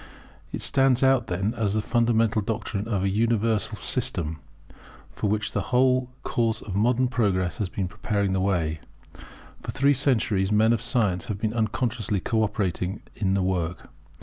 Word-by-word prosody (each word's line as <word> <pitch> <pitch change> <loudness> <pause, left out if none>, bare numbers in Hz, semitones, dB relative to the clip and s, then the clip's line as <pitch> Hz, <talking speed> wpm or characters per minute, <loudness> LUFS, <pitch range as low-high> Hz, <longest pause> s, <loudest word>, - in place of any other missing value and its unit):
It - - -5
stands 135 -1 +3
out 130 -3 +3
then 95 +5 -1
as 105 -3 0
the - - +2
fundamental 115 -1 +2
doctrine 105 0 -3
of 100 -5 -1
an 95 - +1
universal 110 0 +1
system, 80 -1 -1 0.7
for 105 - -2
which 105 0 -1
the - - -1
whole 125 0 +3
course 115 -2 0
of 95 - -7
modern 120 +5 +2
progress 100 -8 0
has 100 -4 -1
been 95 -1 -3
preparing 100 0 -1
the 95 - 0
way. 85 -5 0 0.8
For - - -9
three 140 +2 +3
centuries 110 -8 +1
men 110 +2 +4
of 115 - -1
science 105 -7 +1
have 105 - -4
been 110 +1 -2
unconsciously 110 -2 -1
co 110 +4 0
operating 95 -2 -2
in 95 -2 0
the 95 - +1
work. 90 -2 -2
105 Hz, 165 wpm, -25 LUFS, 95-115 Hz, 0.8 s, men